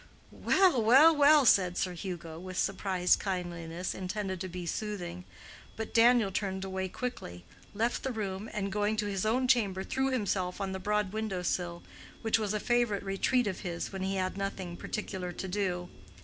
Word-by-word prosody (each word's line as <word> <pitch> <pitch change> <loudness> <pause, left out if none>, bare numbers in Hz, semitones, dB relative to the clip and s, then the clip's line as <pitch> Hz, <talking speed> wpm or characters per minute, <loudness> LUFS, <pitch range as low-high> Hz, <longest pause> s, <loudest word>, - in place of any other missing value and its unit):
"Well, 370 -10 +3
well, 270 +9 +7
well!" 290 -1 +6
said 185 -5 +4
Sir 180 - -1
Hugo, 170 -3 -6
with 185 0 -7
surprised 185 -2 +2
kindliness 175 -2 -3
intended 190 -1 -4
to 185 - -3
be 180 -1 -6
soothing. 180 -2 -4 0.5
But 220 0 -5
Daniel 230 -3 +5
turned 190 -1 -2
away 190 0 -3
quickly, 90 - -6 0.3
left 230 +3 0
the 265 - -2
room, 205 -2 -4
and 200 -2 -3
going 210 +1 0
to 215 - 0
his 200 0 -1
own 255 +3 +2
chamber 205 -7 +2
threw 265 +5 0
himself 200 -7 -1
on 195 -1 -2
the 190 - -4
broad 210 0 0
window 215 -4 -2
sill, 175 -1 -2 0.4
which 225 0 +2
was 215 -1 -1
a - - 0
favorite 240 -3 +1
retreat 200 +6 +1
of 195 -3 -3
his 175 0 -4
when 190 - -4
he 190 +1 -1
had 185 0 -2
nothing 195 -3 -4
particular 185 -2 -4
to 190 - -5
do. 180 -2 -2
195 Hz, 175 wpm, -30 LUFS, 180-220 Hz, 0.5 s, well